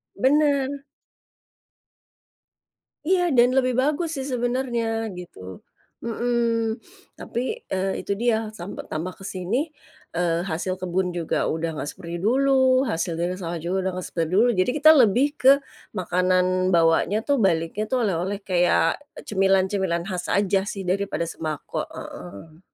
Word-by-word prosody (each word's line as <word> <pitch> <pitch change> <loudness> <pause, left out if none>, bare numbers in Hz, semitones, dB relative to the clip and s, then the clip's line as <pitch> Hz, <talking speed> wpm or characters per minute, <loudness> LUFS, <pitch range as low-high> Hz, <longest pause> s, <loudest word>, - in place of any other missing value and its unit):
Benar. 280 0 +3 2.4
Iya 355 -1 +3
dan 250 -1 +4
lebih 255 -1 +2
bagus 300 +4 0
sih 265 - -4
sebenarnya 245 -1 -1 0.3
gitu. 180 -1 -10 0.6
Mmm. 230 -1 0 0.4
Tapi, - - -4 0.3
eee, 190 0 0
itu - - -4
dia 240 -1 +3 0.2
sampe 190 -1 -8
tambah 170 +4 -4
kesini, 195 - -2 0.5
eee, 170 -1 +1
hasil 175 +3 -2
kebun 185 0 -1
juga 170 -2 -1
udah 165 +1 -2
nggak 145 - -4
seperti 170 -1 -8
dulu, 270 +5 +3 0.4
hasil 170 -1 -1
dari 175 +2 -1
sawah 170 -2 -4
juga 175 +2 -1
udah - - 0
nggak 185 - -5
seperti 165 -2 -2
dulu. 230 +5 +5
Jadi 185 - +3
kita 310 +1 +8
lebih 245 -1 +5
ke 265 - +7 0.4
makanan 180 0 +2 0.3
bawanya 165 +4 +3
tuh 285 - +3
baliknya 165 +3 0
tuh 255 -2 +2
oleh-oleh 190 +2 -2
kayak 180 -2 +2 0.3
cemilan-cemilan 190 -3 +1
khas 180 -3 -4
aja 200 -1 +2
sih 200 -2 -4
daripada 190 -2 -1
sembako. 155 -2 -5
Heeh. 100 - -10
195 Hz, 130 wpm, -24 LUFS, 175-245 Hz, 2.4 s, kita